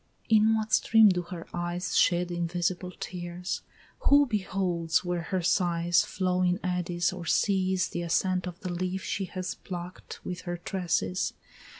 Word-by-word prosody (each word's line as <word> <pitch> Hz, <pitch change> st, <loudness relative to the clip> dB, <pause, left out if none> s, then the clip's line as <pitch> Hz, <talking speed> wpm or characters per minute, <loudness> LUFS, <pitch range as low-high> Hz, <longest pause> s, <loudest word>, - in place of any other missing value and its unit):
In 220 Hz, 0 st, +5 dB
what 220 Hz, -1 st, -2 dB
stream 225 Hz, -2 st, +6 dB
do 180 Hz, -2 st, +1 dB
her 170 Hz, -1 st, -8 dB
eyes 175 Hz, +1 st, -2 dB
Shed 175 Hz, 0 st, +3 dB
invisible 175 Hz, +1 st, -1 dB
tears? 175 Hz, 0 st, -4 dB, 0.5 s
Who 285 Hz, 0 st, +7 dB
beholds 185 Hz, -7 st, 0 dB
where 175 Hz, -1 st, -1 dB
her 185 Hz, +2 st, -2 dB
sighs 175 Hz, -1 st, +3 dB
Flow 185 Hz, -1 st, -1 dB
in 180 Hz, +1 st, +2 dB
eddies, 180 Hz, -1 st, 0 dB
or 175 Hz, -3 st, -7 dB
sees 190 Hz, -1 st, +2 dB
the 175 Hz, -, -3 dB
ascent 180 Hz, +2 st, 0 dB
of 180 Hz, 0 st, -7 dB
the 185 Hz, -, -4 dB
leaf 185 Hz, +2 st, -2 dB
She 195 Hz, -, -2 dB
has 185 Hz, 0 st, -4 dB
pluck'd 180 Hz, -1 st, -8 dB
with 180 Hz, 0 st, -5 dB
her 175 Hz, -, -2 dB
tresses? 170 Hz, -, -1 dB
180 Hz, 155 wpm, -28 LUFS, 175-185 Hz, 0.5 s, Who